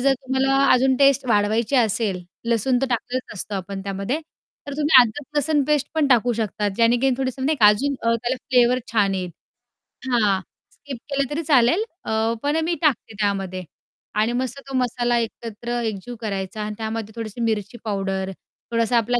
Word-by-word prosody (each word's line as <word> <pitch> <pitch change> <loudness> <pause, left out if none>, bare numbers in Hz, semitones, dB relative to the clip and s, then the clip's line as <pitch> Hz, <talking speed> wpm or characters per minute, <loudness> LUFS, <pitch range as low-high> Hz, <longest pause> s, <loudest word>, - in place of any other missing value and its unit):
जर 275 +2 +4
तुम्हाला 265 +1 0 0.2
अजून 260 +1 +3
टेस्ट 275 0 +4
वाढवायची 220 +4 +2
असेल, 215 -5 +1 0.3
लसूण 235 +2 +2
तर - - +2
टाकलेलाच 245 0 -3
असतो 200 +2 -5
आपण 195 0 -5
त्यामध्ये, 195 +9 -3 0.5
तर 285 - -5
तुम्ही 295 -3 +7
अद्रक-लसूण 295 +5 -1
पेस्ट 295 -1 +1
पण 315 -2 +2
टाकू 245 -2 +4
शकतात, 210 -2 -1
ज्याने 230 +1 +4
की 270 +2 +2
थोडंसं 260 0 -2
म्हणजे - - +1
नाही - - -8
का 210 - +8
अजून 260 +8 +3
अ, 230 0 +2
त्याला 240 +3 -2
फ्लेवर 250 -1 +4
छान 205 -3 +2
येईल. 180 -2 -3 0.8
हां, 210 -5 +2 0.3
स्किप 280 -3 -9
केलं 275 -2 0
तरी 315 +3 -2
चालेल, 285 - +4 0.2
अ, 220 +1 0
पण 290 +2 +1
अ, - - +1
मी 340 +1 0
टाकते 285 -8 +1
त्यामध्ये. 195 -3 -1 0.5
आणि 215 +3 +1
मस्त 260 +1 -4
तो 270 - -8
मसाला 240 -1 +1
एकत्र 235 +1 -4
एकजीव 220 +2 -4
करायचा 195 -1 -4
आणि 210 0 -4
त्यामध्ये 220 -1 -4
थोडीशी 225 0 -6
मिरची 220 0 -1
पावडर, 195 -2 -2 0.4
थोडासा 230 +1 +2
आपल्या 240 +2 +1
235 Hz, 175 wpm, -22 LUFS, 210-265 Hz, 0.8 s, का